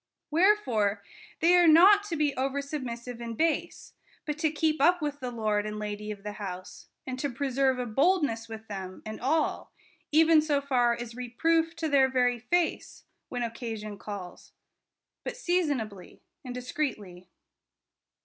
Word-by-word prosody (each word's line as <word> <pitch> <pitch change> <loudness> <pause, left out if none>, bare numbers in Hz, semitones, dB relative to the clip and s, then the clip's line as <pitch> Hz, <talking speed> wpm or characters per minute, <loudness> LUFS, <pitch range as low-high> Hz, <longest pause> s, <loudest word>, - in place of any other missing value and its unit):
Wherefore 255 - +2 0.4
they 345 +2 +5
are 350 -1 +6
not 380 +6 +7
to 360 -5 -3
be 295 -3 0
over 270 +2 -1
submissive 250 -4 -5
and 230 -1 -6
base, 325 -1 -1 0.3
but 300 -1 -3
to 315 -1 +2
keep 310 -1 0
up 350 +4 +5
with 295 -2 -3
the 255 -2 -4
lord 215 -3 -1
and 210 0 -5
lady 210 0 -5
of 205 -2 -7
the 210 - -4
house, 185 -2 -7 0.2
and 255 0 -5
to 285 - -1
preserve 265 0 0
a 250 - -2
boldness 260 - +1
with 220 0 -8
them 190 -2 -7
and 215 0 -7
all, 305 +5 0 0.4
even 320 +1 +6
so 300 -2 +1
far 250 -4 +2
as 240 -1 -7
reproof 325 +7 0
to 330 -1 -2
their 275 -3 +4
very 250 -2 +1
face, 335 +8 -1 0.3
when 245 -1 -3
occasion 225 -3 -5
calls; 195 -4 -8 0.7
but - - -5
seasonably, 285 - -2 0.2
and 250 -2 -6
discreetly. 215 - -4
255 Hz, 155 wpm, -28 LUFS, 220-310 Hz, 0.7 s, not